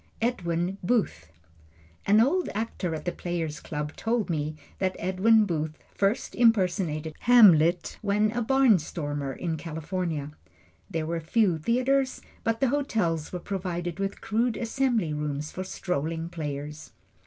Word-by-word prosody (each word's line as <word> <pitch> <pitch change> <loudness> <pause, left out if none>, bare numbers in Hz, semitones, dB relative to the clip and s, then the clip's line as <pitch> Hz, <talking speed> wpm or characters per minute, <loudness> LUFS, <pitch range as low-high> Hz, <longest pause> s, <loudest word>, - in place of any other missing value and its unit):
Edwin 180 -5 -1
Booth 175 - 0 0.8
An 205 +2 +6
old 325 +11 +2
actor 205 -6 -2
at 155 - -7
the 175 - 0
Player's 165 -4 -3
Club 150 0 -5
told 225 -4 -1
me 155 -1 -2 0.2
that 185 -1 0
Edwin 210 +5 +3
Booth 155 -4 -2 0.2
first 200 +3 0
impersonated 180 -9 +2
Hamlet 180 -8 +5
when 210 +1 +2
a 240 +1 -2
barnstormer 170 - +2
in 165 -3 -2
California. 160 -1 -3 0.6
There 165 -4 -2
were 165 +1 -2
few 175 +1 +2
theatres, 255 - +1 0.2
but 225 0 0
the 270 - +3
hotels 215 - 0
were 180 - -3
provided 175 -2 -4
with 195 0 -3
crude 230 +2 0
assembly 230 - 0
rooms 150 0 -3
for 185 - -4
strolling 165 -3 -3
players. 150 -2 -6
180 Hz, 130 wpm, -27 LUFS, 160-225 Hz, 0.8 s, An